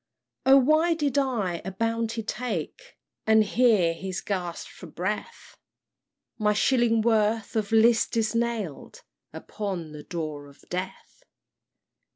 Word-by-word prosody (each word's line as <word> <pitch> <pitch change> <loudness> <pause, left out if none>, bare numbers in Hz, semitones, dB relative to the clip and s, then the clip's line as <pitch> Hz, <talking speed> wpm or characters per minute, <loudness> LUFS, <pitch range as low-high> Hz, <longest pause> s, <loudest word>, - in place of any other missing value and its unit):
"O 270 +1 +8
why 310 +5 +3
did 285 -3 0
I 215 -11 -1
the 190 - -4
bounty 230 +2 -1
take? 240 - -5 0.3
(And 220 0 +6
here 210 -6 +3
he 190 +3 -6
gasp'd 180 -4 -3
for 180 - -12
breath) 210 - -5 0.8
My 210 -1 +2
shillingsworth 225 -2 +2
of 215 -2 -1
'list 225 +1 +4
is 220 -1 +1
nail'd 230 -9 -3 0.3
Upon 185 -7 -5
the 150 -1 -9
door 155 -3 -5
of 140 0 -19
death! 185 - -6
215 Hz, 120 wpm, -26 LUFS, 185-235 Hz, 0.8 s, O